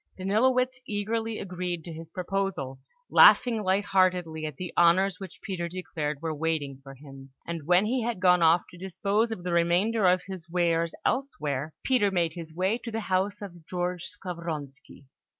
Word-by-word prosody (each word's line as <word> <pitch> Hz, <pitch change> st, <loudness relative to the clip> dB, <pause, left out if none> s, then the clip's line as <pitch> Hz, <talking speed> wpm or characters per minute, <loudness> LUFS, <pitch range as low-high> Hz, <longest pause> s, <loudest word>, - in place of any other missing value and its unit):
Danilowitz 255 Hz, +7 st, +2 dB
eagerly 220 Hz, +2 st, -2 dB
agreed 180 Hz, -2 st, -4 dB
to 170 Hz, -, -8 dB
his 160 Hz, 0 st, -9 dB
proposal, 180 Hz, -8 st, -3 dB, 0.3 s
laughing 230 Hz, -3 st, +7 dB
light 195 Hz, +1 st, +1 dB
heartedly 180 Hz, -5 st, +1 dB
at 150 Hz, -, -7 dB
the 180 Hz, +4 st, -6 dB
honours 180 Hz, +3 st, +4 dB
which 190 Hz, -1 st, -9 dB
Peter 175 Hz, -4 st, -3 dB
declared 155 Hz, -4 st, -4 dB
were 160 Hz, -1 st, -1 dB
waiting 150 Hz, -3 st, -2 dB
for 135 Hz, 0 st, -11 dB
him; 135 Hz, -1 st, -13 dB, 0.2 s
and 165 Hz, -3 st, -5 dB
when 180 Hz, +3 st, +4 dB
he 250 Hz, +3 st, 0 dB
had 230 Hz, -3 st, -2 dB
gone 180 Hz, -1 st, +4 dB
off 165 Hz, +1 st, +5 dB
to 175 Hz, -, -13 dB
dispose 200 Hz, +5 st, 0 dB
of 185 Hz, -6 st, -5 dB
the 180 Hz, -1 st, -2 dB
remainder 180 Hz, +5 st, +2 dB
of 180 Hz, 0 st, +2 dB
his 185 Hz, -4 st, -8 dB
wares 170 Hz, -1 st, +1 dB
elsewhere, 155 Hz, -, -2 dB
Peter 250 Hz, -6 st, +3 dB
made 170 Hz, -4 st, 0 dB
his 165 Hz, -2 st, -8 dB
way 190 Hz, +7 st, 0 dB
to 240 Hz, -, -7 dB
the 225 Hz, 0 st, -3 dB
house 200 Hz, +1 st, -1 dB
of 175 Hz, -4 st, -10 dB
George 180 Hz, 0 st, -3 dB
Skavronski. 165 Hz, -7 st, -7 dB
180 Hz, 170 wpm, -27 LUFS, 165-200 Hz, 0.3 s, laughing